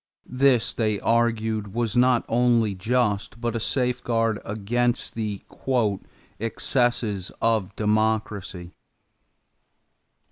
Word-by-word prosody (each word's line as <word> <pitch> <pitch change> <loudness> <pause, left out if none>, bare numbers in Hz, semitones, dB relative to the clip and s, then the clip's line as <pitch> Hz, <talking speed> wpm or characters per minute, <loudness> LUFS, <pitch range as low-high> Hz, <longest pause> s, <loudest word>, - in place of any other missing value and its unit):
This, 130 -2 +2
they 110 -3 0
argued, 110 -3 0
was 115 -2 -1
not 125 -1 +4
only 115 -3 +2
just 110 +1 -1
but 120 0 -2
a - - 0
safeguard 115 -3 0
against 120 +4 -1
the 105 -3 -4 1.0
"excesses 115 -3 0
of 110 -5 0
democracy." 105 -4 -1
115 Hz, 85 wpm, -24 LUFS, 105-120 Hz, 1.0 s, not